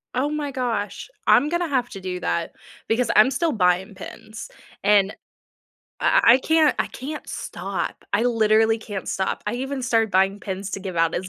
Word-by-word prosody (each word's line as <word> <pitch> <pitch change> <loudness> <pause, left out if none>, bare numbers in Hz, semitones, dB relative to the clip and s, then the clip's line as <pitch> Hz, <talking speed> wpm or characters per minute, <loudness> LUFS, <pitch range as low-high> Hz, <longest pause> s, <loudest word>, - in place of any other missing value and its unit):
Oh 265 +4 +1
my 300 -1 -3
gosh. 240 - -3 0.2
I'm 285 +5 +5
gonna 345 +1 0
have 255 -5 0
to 195 - -9
do 180 -1 -4
that 170 -1 -2 0.3
because 230 +1 +1
I'm 215 +5 +7
still 325 +5 0
buying 185 -3 +1
pins 215 +3 -9 0.3
and 200 -1 +4 0.9
I - - +4
I 235 +3 +7
can't 315 +2 +3
I - - +1
can't 300 +4 -7
stop. 185 0 -5
I 205 +3 +2
literally 225 -1 +3
can't 205 -4 -6
stop. 190 - -2
I 210 - -1
even 265 +2 -3
started 225 -3 +1
buying 195 +1 +2
pins 195 0 -5
to 195 - -4
give 185 -2 -6
out 165 0 +2
as 185 +1 -3
220 Hz, 180 wpm, -23 LUFS, 195-255 Hz, 0.9 s, I'm